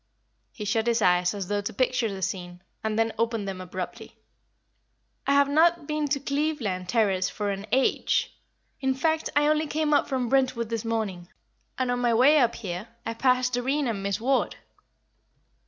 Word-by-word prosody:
He 210 - -7
shut 220 +2 0
his 230 -2 +2
eyes 180 +1 +3
as 195 -3 -4
though 205 +1 0
to 205 - -5
picture 250 -1 +1
the 190 -1 -5
scene, 175 -1 -4 0.2
and 220 0 -1
then 225 0 +1
opened 230 -3 0
them 190 -1 -5
abruptly. 185 0 -7 1.1
"I 280 - +4
have 280 0 +5
not 325 +2 +3
been 300 0 -1
to 280 0 0
Cleveland 275 - -2
Terrace 200 -5 +2
for 205 -1 -2
an 200 +1 -5
age. 265 +2 +1 0.4
In 265 -1 0
fact, 315 +3 0
I 290 0 +4
only 305 +1 +2
came 305 0 0
up 290 - +3
from 260 -3 -1
Brentwood 255 -3 +1
this 230 -2 -2
morning, 215 -6 -3 0.5
and 255 -1 0
on 245 - 0
my 240 -2 +2
way 280 +6 +6
up 240 -3 +2
here 190 -1 -5 0.2
I 230 - -2
passed 250 +1 +2
Doreen 270 +4 0
and 215 -4 -2
Miss 200 0 -1
Ward." 260 +4 +1
235 Hz, 180 wpm, -26 LUFS, 200-275 Hz, 1.1 s, way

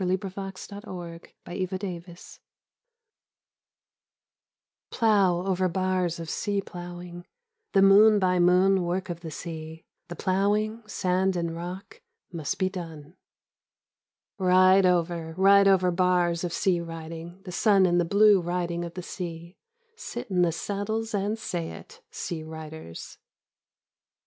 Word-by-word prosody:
32 185 +1 -1
Slabs 195 0 -7
of 200 0 -7
the - - -16
Sunburnt 170 -2 -8 0.2
West 185 +1 -4 0.2
FINS 175 -1 -14 2.5
Plow 195 -6 +2
over 185 -1 +1
bars 185 -1 -1
of 165 - -6
sea 200 +4 -1
plov/ing, 175 -1 -8 0.5
the 195 -2 +5
moon 210 +2 +7
by 180 -2 +2
moon 180 +2 +4
work 180 +1 -2
of 170 - -6
the 165 -1 -7
sea, 160 0 -8 0.2
the 175 - -7
plowing, 210 +5 0
sand 190 -1 0
and 170 -1 -2
rock, 185 - -8 0.3
must 160 -4 -3
be 185 - +1
done. 165 -4 -8 1.2
Ride 185 +1 +5
over, 170 -2 0
ride 200 +1 +6
over 185 -2 +4
bars 175 -1 +1
of 175 - -2
sea 180 0 +1
riding, 165 +2 -8
the 185 - -8
sun 195 +1 +4
and 175 -1 +3
the - - +2
blue 200 +2 +5
riding 175 0 -2
of 170 0 -7
the 180 - -5
sea 170 0 -7 0.2
— 475 -1 -44
sit 455 - -7
in 180 -1 +2
the 175 -1 +3
saddles 215 +6 -3
and 205 +2 -1
say 175 -6 -4
it, 470 +2 -13
sea 170 -3 -5
riders. 160 - -9
180 Hz, 140 wpm, -26 LUFS, 170-195 Hz, 2.5 s, moon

